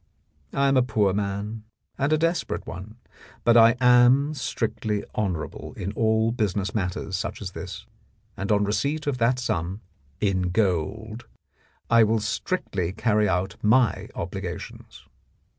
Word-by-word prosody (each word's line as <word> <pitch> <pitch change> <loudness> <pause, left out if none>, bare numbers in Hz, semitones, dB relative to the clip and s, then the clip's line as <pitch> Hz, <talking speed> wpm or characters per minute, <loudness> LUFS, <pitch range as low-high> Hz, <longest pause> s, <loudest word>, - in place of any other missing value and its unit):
I 140 0 +2
am 135 -1 +3
a - - +6
poor 110 -5 +1
man, 100 +2 -3 0.3
and 140 +2 0
a 155 - +4
desperate 165 +2 -1
one, 95 +5 -8 0.5
but 120 - +5 0.2
am 125 +4 +5
strictly 110 -6 -2
honourable 90 -7 -3
in 95 - -4
all 110 0 +2
business 105 -4 -1
matters 95 -1 -2
such 90 - -4
as 95 -3 -6
this, - - -8 0.5
and 100 +2 -3
on 105 -1 +3
receipt 140 +10 -1
of 140 -3 -1
that 120 +2 +3
sum 95 -4 -2 0.4
in 95 -3 +1
gold 105 +4 -1 0.6
I 115 -1 +6
will 110 +1 +2
strictly 105 - -2
carry 105 -1 +2
out 90 +2 -1
my 115 +1 +3
obligations. - - -7
110 Hz, 135 wpm, -25 LUFS, 100-120 Hz, 0.6 s, a